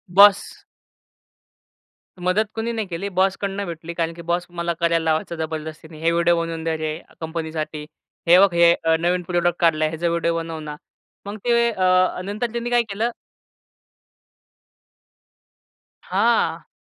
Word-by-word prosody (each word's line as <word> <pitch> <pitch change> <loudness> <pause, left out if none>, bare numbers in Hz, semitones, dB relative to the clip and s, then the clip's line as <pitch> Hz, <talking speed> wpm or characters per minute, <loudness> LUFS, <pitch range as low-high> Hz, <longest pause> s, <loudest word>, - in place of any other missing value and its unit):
Boss. 200 -1 +7 1.8
मदत 205 +4 +2
कुणी 225 +1 -2
नाही 220 -3 -3
केली 180 +3 -4
बॉसकडून 195 +1 0
भेटली 170 0 -7
कारण 165 -1 -2
की 170 - -10
बॉस 175 +1 -1
मला 170 0 -2
करायला 170 0 +1
लावायचा 160 +1 0
जबरदस्तीने, 160 0 -6
हे 165 +1 +2
व्हिडिओ 170 0 +3
बनवून 165 -1 -4
दे 165 -1 -1
रे 155 0 -3 0.2
कंपनीसाठी, 160 -2 -4 0.4
हे 175 +2 +8
बघ 195 -3 +5
हे 170 0 +6
अ, 165 0 +3
नवीन 180 +1 +1
प्रॉडक्ट 175 0 0
काढलाय 155 -2 +3
ह्याचा 165 +2 -2
व्हिडिओ 170 0 0
बनव 165 -1 -4
ना. 150 -1 -7 0.5
मग 205 +2 -6
ते 235 0 +3
अ, 185 -2 +2
नंतर 215 +4 -3
त्यांनी 235 0 -3
काय 240 0 +4
केलं. 220 +4 -1 2.9
हां. - - +1
170 Hz, 140 wpm, -22 LUFS, 160-195 Hz, 2.9 s, हे